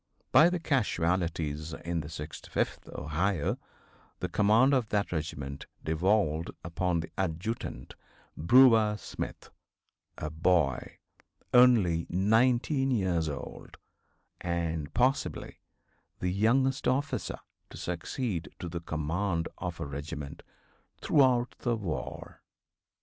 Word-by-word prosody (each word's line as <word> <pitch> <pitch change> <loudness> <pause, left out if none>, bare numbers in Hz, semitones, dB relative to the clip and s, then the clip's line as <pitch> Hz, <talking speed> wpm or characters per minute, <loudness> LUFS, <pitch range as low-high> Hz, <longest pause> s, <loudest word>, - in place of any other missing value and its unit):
By 160 +3 +7
the 180 0 -1
casualties 85 - 0
in 85 0 -3
the 75 - -8
65th 75 -1 -4
Ohio 80 +2 -1 0.6
the - - -3
command 110 +7 +4
of 125 -5 +1
that 100 -1 0
regiment 70 -4 -4 0.2
devolved 80 -1 +1
upon 85 0 -1
the 80 - -9
adjutant, 90 - -3 0.4
Brewer 110 +2 +6
Smith, - - -7 0.7
a 75 - -4
boy 80 -5 +1 0.6
only 110 -10 +5
19 120 - +2
years 90 -9 +1
old, 70 -1 -8 0.6
and 85 -3 -2
possibly 130 +3 0 0.6
the 90 - -1
youngest 130 +7 +2
officer 135 +3 -1 0.3
to - - -10
succeed 90 - -3
to 90 - -6
the 85 0 -5
command 85 +3 -2
of 90 -2 -4
a - - -3
regiment 70 0 -6 0.6
throughout 130 -4 +3
the 120 -2 0
war. 100 -8 -5
90 Hz, 105 wpm, -29 LUFS, 80-120 Hz, 0.7 s, By